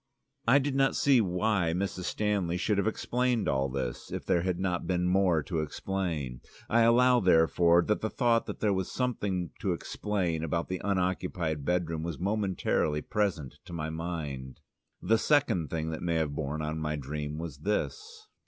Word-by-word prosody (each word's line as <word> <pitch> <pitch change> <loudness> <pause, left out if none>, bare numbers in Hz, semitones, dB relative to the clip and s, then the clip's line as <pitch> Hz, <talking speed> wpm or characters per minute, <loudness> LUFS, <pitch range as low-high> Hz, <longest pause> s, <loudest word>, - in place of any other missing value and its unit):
I 125 +4 +7
did 140 0 0
not 135 0 +2
see 135 -4 +4
why 90 -2 +1
Mrs. 95 -1 -3
Stanley 100 -5 0
should 100 +2 +1
have 100 - +1
explained 120 0 0
all 70 0 +1
this, 65 -2 -4
if - - -4
there 85 - +2
had 90 0 -1
not 90 -2 -1
been 90 -1 +1
more 90 -4 +3
to 80 +1 -2
explain. 80 -6 -3 0.3
I 115 +1 +3
allow, 125 +2 +5
therefore, 85 -1 +4
that 105 +3 0
the 110 - -1
thought 115 -1 +2
that - - -6
there 105 -2 +3
was 95 -1 -2
something 100 -9 -1
to - - 0
explain 90 -6 -2
about 85 +1 -2
the 95 -1 -3
unoccupied 90 -6 -1
bedroom 85 -2 0
was 80 -2 -4
momentarily 95 -6 0
present 95 -10 -2
to - - -10
my 80 -1 -3
mind. 75 -6 -5 0.4
The 115 0 +3
second 110 - +2
thing 80 -1 -2
that 80 - -5
may 85 -1 0
have 80 -3 0
borne 75 +1 -3
on 80 +1 -3
my 75 0 -2
dream 75 +1 -4
was 80 -4 -6
this. 430 - -3
90 Hz, 175 wpm, -29 LUFS, 80-105 Hz, 0.4 s, I